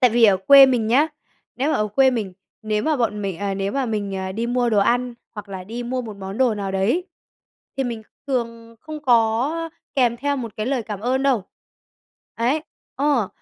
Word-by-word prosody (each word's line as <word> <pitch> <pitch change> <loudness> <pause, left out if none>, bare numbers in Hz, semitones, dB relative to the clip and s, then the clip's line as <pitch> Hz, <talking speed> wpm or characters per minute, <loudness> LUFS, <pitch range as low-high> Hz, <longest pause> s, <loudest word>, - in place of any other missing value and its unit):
Tại 250 -3 +5
vì 235 0 +4
ở 200 -3 +6
quê 275 +8 +8
mình 240 -4 +1
nhá, 275 +7 +3 0.5
nếu 280 +5 0
mà - - +2
ở 210 0 0
quê 265 +5 +4
mình, 215 -7 -3 0.3
nếu 215 -1 -1
mà 310 -2 +1
bọn 210 -4 -1
mình 190 -4 -3
ờ, 200 -1 -2
nếu 195 +1 -2
mà 275 -2 -1
mình, 205 -3 -2
ờ, 190 0 -4
đi 230 +4 -2
mua 245 -1 +1
đồ 210 - +3
ăn 245 +3 +1 0.2
hoặc 210 -1 -8
là 190 -2 -7
đi 230 +4 -6
mua 250 +1 -3
một 215 -3 -8
món 195 +2 -7
đồ 250 -4 +3
nào 195 -2 -4
đấy 230 - +1 0.7
thì 270 - 0
mình 230 -3 -4 0.2
thường 230 -3 -3
không 310 -1 -8
có 250 +6 +2 0.2
kèm 245 -3 +2
theo 285 +3 -1
một 230 -4 -6
cái 215 - -3
lời 260 -2 0
cảm 210 -2 -6
ơn 255 +4 0
đâu. 255 -8 +2 0.9
Ấy, 255 +7 0 0.3
ờ, 275 -8 +1
235 Hz, 215 wpm, -22 LUFS, 210-260 Hz, 0.9 s, quê